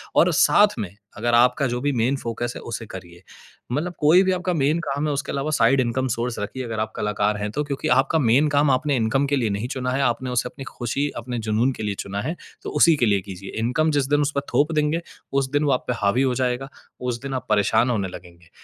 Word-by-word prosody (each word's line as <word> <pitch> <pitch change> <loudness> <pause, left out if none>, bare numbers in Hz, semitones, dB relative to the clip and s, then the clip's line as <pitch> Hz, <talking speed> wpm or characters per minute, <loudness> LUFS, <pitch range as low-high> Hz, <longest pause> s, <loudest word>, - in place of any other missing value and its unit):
और - - +5
साथ 205 -5 +4
में 100 -2 -5 0.2
अगर 120 +2 0
आपका 125 +4 +4
जो 120 0 -2
भी 145 - +1
मेन 125 +1 +1
फ़ोकस 120 0 -4
है, - - -7
उसे 115 0 -6
करिए। 85 -2 -10 0.5
मतलब 165 +7 -2
कोई 160 +5 +6
भी 190 - +1
आपका 180 0 -1
मेन 150 +1 +1
काम 145 -1 -2
है, 150 - 0
उसके 140 0 -3
अलावा 140 +2 -2
साइड 135 -1 +3
इनकम 130 +2 -1
सोर्स 120 +1 -2
रखिए, 110 +6 -4
अगर 115 -3 -4
आप 110 0 -2
कलाकार 105 0 0
हैं 105 0 -3
तो, 150 - -1
क्योंकि 140 -2 -3
आपका 135 +4 +2
मेन 135 +4 +4
काम 145 0 +3
आपने 140 +2 +1
इनकम 125 +4 +1
के 145 - +1
लिए 120 -5 0
नहीं 100 +4 -2
चुना 130 -1 -3
है। 135 +2 0
आपने 125 0 0
उसे 125 0 0
अपनी 135 - -10
खुशी, 135 +4 -2
अपने 120 +1 -4
जुनून 115 +5 +2
के 110 - -7
लिए 100 -1 -2
चुना 100 +1 -4
है, 160 +8 -3 0.3
तो - - -4
उसी 165 -2 +6
के 125 - +2
लिए 100 -3 +2
कीजिए, 95 0 -9
इनकम 125 +8 +1
जिस 145 -3 +1
दिन 145 0 +3
उस 145 0 0
पर 140 - +1
थोप 150 +3 +3
देंगे, 150 +2 +1 0.3
उस 135 -1 +1
दिन 145 +1 +1
वो 145 - +2
आप 125 - +1
पे 125 - +1
हावी 100 +6 +2
हो 130 -2 +1
जाएगा, 130 +1 -1 0.3
उस 125 -1 -3
दिन 135 -1 -5
आप 130 - -3
परेशान 105 +4 +3
होने 105 -6 0
लगेंगे। 85 -1 -12
125 Hz, 250 wpm, -23 LUFS, 115-145 Hz, 0.5 s, कोई